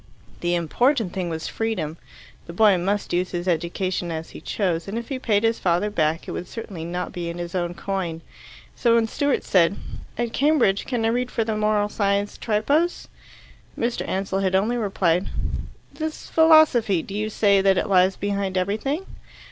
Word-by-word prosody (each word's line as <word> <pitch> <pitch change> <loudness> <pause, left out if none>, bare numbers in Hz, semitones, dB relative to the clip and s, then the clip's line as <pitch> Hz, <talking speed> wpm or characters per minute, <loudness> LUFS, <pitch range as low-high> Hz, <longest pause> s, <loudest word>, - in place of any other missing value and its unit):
The 175 0 0
important 220 - +1
thing 180 -2 -2
was 160 -1 -4
freedom. 190 -9 -2 0.5
The 170 - -7
boy 210 +1 +5
must 200 +3 -1
use 180 +1 +1
his 175 0 -4
education 175 +1 -1
as 160 0 -5
he - - -10
chose, 175 -4 -1
and 205 +3 -4
if 235 -1 -5
he 270 -2 -3
paid 215 -4 +1
his 225 0 +2
father 180 +4 +1
back 160 -4 0
it - - -4
would 180 - -5
certainly 195 -7 -7
not 180 +2 -4
be 175 -1 -4
in 170 - -6
his 175 0 -5
own 175 -1 -2
coin. 175 -3 -3 0.5
So 235 -1 +3
when 230 -1 +3
Stewart 285 +4 0
said, 185 0 +3 0.4
"At 240 -1 -2
Cambridge, 275 -9 +2
can 240 -4 -1
I - - +3
read 245 +2 0
for 230 - 0
the 220 -1 -2
Moral 210 -1 +2
Science 200 -1 0
Tripos?" 280 +11 0 0.7
Mr. 235 +1 -1
Ansell 195 0 -1
had 190 -1 +1
only 215 +6 +2
replied, 195 -5 +1 0.6
"This 315 -1 -5
philosophy 310 - +5
do 195 - -9
you 210 +1 -2
say 200 -2 +3
that 195 -1 +3
it - - 0
lies 185 -1 +4
behind 200 -1 -2
everything?" 220 - -1
200 Hz, 180 wpm, -23 LUFS, 175-225 Hz, 0.7 s, boy